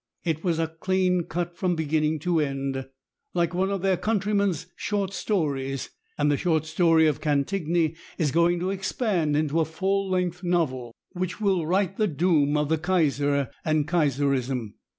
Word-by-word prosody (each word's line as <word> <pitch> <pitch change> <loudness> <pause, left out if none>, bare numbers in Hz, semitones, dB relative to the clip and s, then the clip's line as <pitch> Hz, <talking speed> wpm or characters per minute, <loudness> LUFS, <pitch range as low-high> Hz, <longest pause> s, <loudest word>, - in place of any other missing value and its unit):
It 160 -1 -2
was 170 -3 0 0.2
clean 185 -2 +1
cut 175 +1 -3
from 180 -1 0
beginning 155 0 0
to 175 0 +1
end, 135 -2 -2 0.5
like 170 0 +1
one 190 +2 +1
of 195 -2 -2
their 190 -2 +2
countrymen's 200 -4 0
short 200 -2 -2
stories, 145 - -2 0.3
and 145 0 +2
the 145 - +2
short 160 -2 +1
story 160 0 +4
of 150 -3 +1
Cantigny 160 +2 0 0.2
is 150 -5 +1
going 170 +2 +3
to 185 +2 0
expand 190 - 0
into 155 +1 +1
a - - +4
full 195 +4 -1
length 180 -1 -1
novel, 130 -10 -1 0.2
which 185 +1 -4
will 190 -6 +1
write 190 +2 +1
the 215 - +2
doom 150 -3 +2
of 150 0 +1
the 160 -1 +1
Kaiser 145 -6 +1
and 155 -1 +1
Kaiserism. 135 - 0
165 Hz, 160 wpm, -26 LUFS, 150-185 Hz, 0.5 s, story